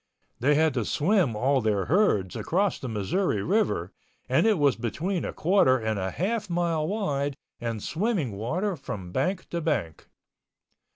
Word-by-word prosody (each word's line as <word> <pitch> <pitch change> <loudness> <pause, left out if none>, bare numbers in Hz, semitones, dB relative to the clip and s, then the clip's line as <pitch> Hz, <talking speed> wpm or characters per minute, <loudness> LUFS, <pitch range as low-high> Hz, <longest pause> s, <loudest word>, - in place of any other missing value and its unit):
They 145 +4 +3
had 160 -1 +3
to 125 -3 0
swim 160 - +1
all 130 +4 +2
their 105 -4 +1
herds 120 - +2
across 195 +2 0
the 130 - -5
Missouri 105 - 0
River 215 +5 0 0.4
and - - +3
it 215 -3 +3
was 145 -4 +3
between 160 - -2
a - - -3
quarter 165 -7 +3
and 110 -3 -2
a 95 0 -1
half 210 - -2
mile 170 -3 0
wide 145 -9 -1 0.2
and 115 -3 -4
swimming 180 - -1
water 165 - -2
from 100 - -7
bank 185 - -1
to 170 - -2
bank. 120 - -2
150 Hz, 160 wpm, -26 LUFS, 115-185 Hz, 0.4 s, They